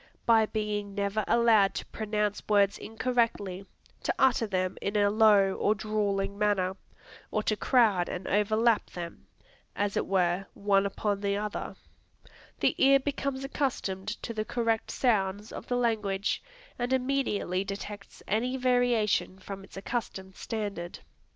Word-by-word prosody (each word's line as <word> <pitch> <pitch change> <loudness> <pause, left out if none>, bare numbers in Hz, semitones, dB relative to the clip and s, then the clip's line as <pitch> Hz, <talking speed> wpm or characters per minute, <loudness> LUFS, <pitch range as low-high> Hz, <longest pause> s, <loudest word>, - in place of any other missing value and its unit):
By 225 -2 +5
being 210 -2 -3
never 200 +1 0
allowed 225 -4 +4
to - - -4
pronounce 210 -1 -2
words 200 -1 +3
incorrectly, 220 -5 -1 0.3
to - - -1
utter 245 -4 +3
them 185 -2 -1
in 200 - -2
a 205 -1 +3
low 205 -3 +5
or 210 - +1
drawling 200 -1 -1
manner, 195 -3 +1 0.5
or 215 - -1
to 215 - +1
crowd 210 -7 +3
and 180 +1 -5
overlap 215 +2 +2
them, 170 -1 -8 0.5
as 205 -1 -1
it - - 0
were, 185 0 +1
one 200 -1 +2
upon 200 0 -2
the 200 0 0
other, 210 0 -4 0.9
the - - +3
ear 275 0 +7
becomes 275 -1 -3
accustomed 255 -9 -2 0.2
to 230 - -4
the 215 -1 -2
correct 230 -1 -1
sounds 205 -3 0
of - - -8
the 245 - 0
language, 215 -4 0 0.4
and 245 +1 -1
immediately 250 -8 0
detects 200 +1 -8
any 245 +6 0
variation 245 -6 +2
from 195 0 -8
its 195 - -13
accustomed 195 -3 -4
standard. 205 -6 -4
210 Hz, 140 wpm, -29 LUFS, 195-230 Hz, 0.9 s, ear